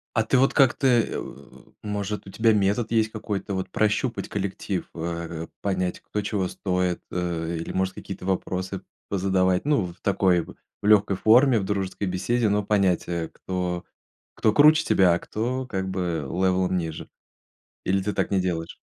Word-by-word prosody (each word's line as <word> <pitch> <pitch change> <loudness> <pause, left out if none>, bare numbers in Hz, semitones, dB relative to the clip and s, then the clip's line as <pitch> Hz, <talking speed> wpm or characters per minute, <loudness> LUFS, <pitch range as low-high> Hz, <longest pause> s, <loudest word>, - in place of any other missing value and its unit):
А 110 - +3
ты 130 - +2
вот 135 +2 +3
как-то, 135 0 +4
э, 120 -3 +2
о, 70 +1 -11
может, 105 0 -3
у - - -9
тебя 110 +1 +3
метод 105 +3 +1
есть 110 -1 +2
какой-то, 105 -2 -4
вот, 95 0 -3
прощупать 110 +4 0
коллектив, 100 -1 -3
в 80 - -7
э, 85 -1 -4
понять, 90 -2 -1
кто 105 - -3
чего 100 -2 -1
стоит, 90 -2 -1
э, 85 -2 -2
или, - - -5
может, 95 0 -1
какие-то 95 - -8
вопросы 95 0 -2 0.3
позадавать, 95 0 +1
ну, 145 -11 +2
в 85 - -12
такой, 95 -3 +2
в - - -13 0.3
легкой 105 -2 +4
форме, 120 +1 +5
в - - -3
дружеской 100 0 -2
беседе, 105 +5 0
но 105 0 +1
понять, 100 -4 +1
э, 85 -2 -3
кто 90 -1 -4 0.5
кто 110 - +2
круче 155 +4 +6
тебя, 90 -3 +4
а - - -2
кто, 125 +4 -3
как 95 -4 -3
бы, 90 -5 -2
левелом 95 0 +1
ниже, 80 -2 -5 0.8
или 95 0 +1
ты 105 +1 -1
так - - -1
не 95 - +3
делаешь? 85 -3 -3
95 Hz, 170 wpm, -25 LUFS, 90-105 Hz, 0.8 s, круче